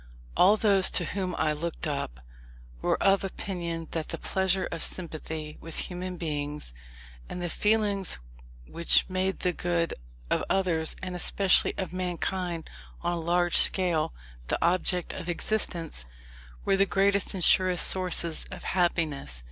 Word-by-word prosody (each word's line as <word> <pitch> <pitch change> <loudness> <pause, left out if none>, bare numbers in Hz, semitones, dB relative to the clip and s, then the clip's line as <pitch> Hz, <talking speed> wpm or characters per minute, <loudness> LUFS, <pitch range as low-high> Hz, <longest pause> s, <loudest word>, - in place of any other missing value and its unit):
All 200 +4 +6
those 195 -3 +5
to 175 - +1
whom 185 0 -3
I 155 - +1
looked 165 +2 -5
up, 140 - -3 0.6
were - - +1
of 195 0 +4
opinion 170 -4 -4
that 160 -2 -3
the - - -3
pleasure 190 0 0
of 165 - -4
sympathy 155 -3 -4
with 165 -1 -7
human 180 0 -4
beings, 150 - -3 0.6
and - - -5
the 175 -1 -3
feelings 210 -2 +1 0.5
which 170 - +3
made 185 +1 -1
the 180 -1 +1
good 170 -1 -1 0.4
of - - +2
others, 170 -5 +1
and 185 -1 -4
especially 190 +2 +3
of 185 -2 -4
mankind 180 -1 -3 0.4
on 175 - 0
a 170 - -2
large 175 +1 +3
scale, 175 -5 +3 0.4
the - - 0
object 180 +1 +1
of 175 - -6
existence, 170 - -1 0.6
were 195 - +3
the 195 +1 +3
greatest 200 +1 +2
and 185 - +1
surest 185 0 +5
sources 175 -3 +2
of - - -9
happiness. 160 - 0
175 Hz, 145 wpm, -28 LUFS, 165-190 Hz, 0.6 s, All